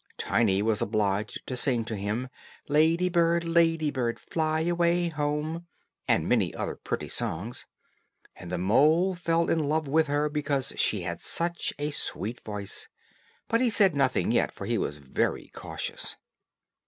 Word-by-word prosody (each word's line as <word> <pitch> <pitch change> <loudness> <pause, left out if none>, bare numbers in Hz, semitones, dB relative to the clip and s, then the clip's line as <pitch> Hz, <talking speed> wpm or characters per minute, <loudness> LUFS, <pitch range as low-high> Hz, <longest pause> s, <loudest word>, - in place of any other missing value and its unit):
Tiny 100 -4 +2
was 110 -1 +1
obliged 105 0 -1
to 130 - -4
sing 125 -3 +1
to 115 - -3
him, 105 +5 -2 0.4
"Lady 160 +5 +3
bird, 170 -1 +2
lady 165 -2 +2
bird, 120 -4 -1
fly 155 -1 -1
away 175 +1 +2
home," 155 +2 -2 0.4
and - - +2
many - - +2
other - - -3
pretty - - -4
songs. 100 +10 -3 0.7
And 90 -1 -9
the 90 - -1
mole 155 - +4
fell 170 -1 +1
in 165 - +2
love 155 0 0
with 155 +3 +3
her 145 +1 +1
because 145 -3 -1
she 105 - +1
had 85 0 -4
such 170 0 0
a 145 +1 -2
sweet 115 -4 -3
voice; 105 -2 -5 0.6
but 230 +1 +2
he 250 - +4
said 200 -5 +4
nothing 135 -2 +2
yet, - - +2
for - - -8
he - - 0
was 75 - -2
very 70 -3 -2
cautious. - - -5
150 Hz, 155 wpm, -28 LUFS, 110-165 Hz, 0.7 s, mole